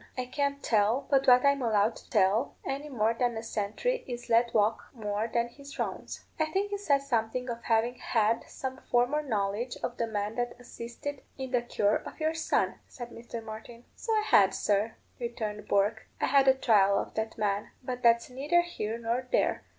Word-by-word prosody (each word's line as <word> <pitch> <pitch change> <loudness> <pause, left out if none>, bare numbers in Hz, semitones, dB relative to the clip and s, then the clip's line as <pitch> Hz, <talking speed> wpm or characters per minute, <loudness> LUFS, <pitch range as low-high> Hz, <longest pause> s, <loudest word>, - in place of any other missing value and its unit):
I 255 - -1
can't 280 +2 -2
tell 220 +4 +2
but 275 0 +3
what 250 +1 +7
I'm 280 -1 +4
allowed 220 -2 +2
to - - -16
tell, 210 +4 +2
any 280 +2 -3
more 225 -4 +1
than 240 0 0
a 225 - -4
sentry 225 - -2
is 245 -1 -6
let 235 +1 +4
walk 215 +1 +2
more 210 0 -2
than 235 0 +1
his 280 +3 -12
rounds." - - -4
"I 315 - +3
think 390 +6 -1
you 405 - -2
said 280 -8 +2
something 250 -1 -1
of 235 0 -7
having 230 +1 +2
had 225 0 +1
some 260 0 -5
former 245 +5 +3
knowledge 220 -2 -2
of 245 - -3
the 230 - 0
man 210 0 -3
that 245 0 -2
assisted 245 +4 -7 0.2
in 265 -1 -5
the 245 -2 +2
cure 210 -3 +1
of - - -10
your 315 +1 +1
son," 325 - 0
said 240 -2 -9
Mr. 230 0 -7
Martin. 225 +2 -9
"So 455 - -4
I 430 -1 +2
had, 195 - +5
sir," 210 +2 +1 0.2
returned 215 -3 -4
Bourke. 205 +3 +1
"I - - +2
had 275 -1 +4
a 265 - +7
trial 200 -6 +4
of - - -3
that 220 0 -3
man. 205 -1 -1
But 250 0 -4
that's 235 -1 +4
neither 290 +7 +2
here 230 -11 -4
nor 235 +2 -2
there. - - +2
235 Hz, 195 wpm, -29 LUFS, 220-265 Hz, 0.2 s, what